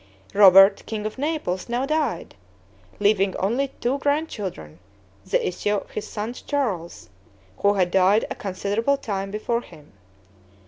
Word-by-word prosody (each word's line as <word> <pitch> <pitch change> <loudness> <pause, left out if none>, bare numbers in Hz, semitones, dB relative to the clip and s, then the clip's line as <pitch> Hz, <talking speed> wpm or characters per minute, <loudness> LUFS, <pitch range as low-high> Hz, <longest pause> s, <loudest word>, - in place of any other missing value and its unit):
Robert 195 0 +7
king 215 -1 -4
of 215 +4 -5
Naples, 285 - -2
now 245 +3 0
died, 295 - -2 0.7
leaving 200 -2 +2
only 240 +9 0
two 260 +4 -1
grandchildren, 220 - -3 0.5
the - - +1
issue 205 +3 -1
of 200 - -5
his 210 - -5
sons 220 +3 -5
Charles, 195 - -3 0.5
who 200 0 +3
had 180 -2 +1
died 190 +4 +4
a - - 0
considerable 205 +7 -1
time 195 -6 -4
before 225 +3 -2
him. 150 -10 -16
210 Hz, 135 wpm, -23 LUFS, 190-245 Hz, 0.7 s, Robert